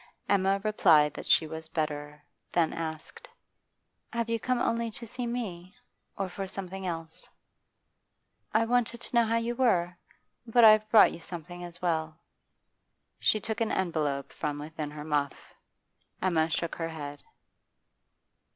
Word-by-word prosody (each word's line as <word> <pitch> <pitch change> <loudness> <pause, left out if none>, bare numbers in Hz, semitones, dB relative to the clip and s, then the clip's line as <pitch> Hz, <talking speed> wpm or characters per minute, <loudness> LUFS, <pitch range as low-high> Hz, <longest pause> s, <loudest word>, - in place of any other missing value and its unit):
Emma 195 0 +3
replied 155 -9 +4
that - - -8
she 160 - +5
was 160 +1 -7
better, 150 -2 -3 0.3
then 165 -2 +2
asked: 160 -1 -6 0.8
'Have 235 -1 -2
you 230 - +1
come 255 +3 0
only 230 -1 0
to 235 +2 -5
see 240 +2 -4
me; 200 -6 -5 0.4
or 195 - -1
for 195 +1 -5
something 190 0 -5
else?' 165 -2 -6 1.2
'I 220 +1 +3
wanted 240 0 +1
to 250 - -5
know 235 -1 +5
how 225 - +1
you 230 +1 -1
were; 180 -9 +2 0.5
but 235 +1 +4
I've 215 -1 +7
brought 220 - +7
you - - -8
something 175 +1 -7
as 175 +1 -10
well' 160 -2 -1 1.0
She 215 - +3
took 220 +2 -4
an 225 - +1
envelope 155 -6 -1
from 150 -1 -3
within 150 0 -5
her 150 0 -8
muff. 145 -2 -2 0.7
Emma 165 -4 +2
shook 165 +1 -2
her 165 -1 -2
head. 145 -3 -7
175 Hz, 145 wpm, -29 LUFS, 160-220 Hz, 1.2 s, I've